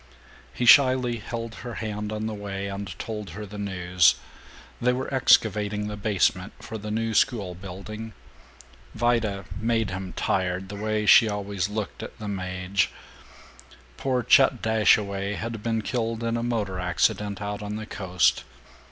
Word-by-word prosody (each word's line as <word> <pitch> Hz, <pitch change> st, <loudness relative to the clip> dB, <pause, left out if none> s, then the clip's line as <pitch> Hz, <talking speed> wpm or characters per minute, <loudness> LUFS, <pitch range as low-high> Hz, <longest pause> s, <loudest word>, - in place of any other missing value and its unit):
He 125 Hz, -, -2 dB
shyly 130 Hz, -2 st, +6 dB
held 115 Hz, +1 st, -5 dB
her 120 Hz, -1 st, -6 dB
hand 105 Hz, -1 st, -4 dB
on 110 Hz, 0 st, -3 dB
the 110 Hz, -, -3 dB
way, 100 Hz, -1 st, -5 dB
and 100 Hz, -3 st, -6 dB
told 105 Hz, -4 st, -5 dB
her 105 Hz, -, -5 dB
the 105 Hz, +1 st, -9 dB
news: 90 Hz, -5 st, +3 dB, 0.7 s
they 125 Hz, +1 st, +3 dB
were 130 Hz, +2 st, -4 dB
excavating 105 Hz, -5 st, +3 dB
the 105 Hz, 0 st, -4 dB
basement 100 Hz, -2 st, 0 dB
for 110 Hz, -, -7 dB
the 105 Hz, +1 st, -6 dB
new 115 Hz, +1 st, -1 dB
schoolbuilding, 100 Hz, +1 st, -2 dB, 0.8 s
Vida 110 Hz, -4 st, 0 dB
"made 115 Hz, -2 st, 0 dB
him 95 Hz, 0 st, -5 dB
tired 95 Hz, 0 st, -1 dB
the 100 Hz, -, -6 dB
way 105 Hz, +1 st, -1 dB
she 110 Hz, +1 st, +7 dB
always 100 Hz, -2 st, -2 dB
looked 105 Hz, -1 st, -4 dB
at -, -, -8 dB
the 110 Hz, -2 st, -7 dB
Maje," 95 Hz, -1 st, -1 dB, 1.1 s
poor 130 Hz, -2 st, 0 dB
Chet 125 Hz, 0 st, +5 dB
Dashaway 105 Hz, -2 st, +2 dB
had 115 Hz, 0 st, -5 dB
been 115 Hz, -1 st, -1 dB
killed 115 Hz, 0 st, -2 dB
in 115 Hz, 0 st, 0 dB
a 115 Hz, -, -1 dB
motor 110 Hz, -6 st, -2 dB
accident 90 Hz, +4 st, 0 dB
out 100 Hz, 0 st, -4 dB
on 105 Hz, 0 st, -4 dB
the 110 Hz, 0 st, -5 dB
Coast. 90 Hz, -4 st, +1 dB
105 Hz, 150 wpm, -25 LUFS, 100-115 Hz, 1.1 s, she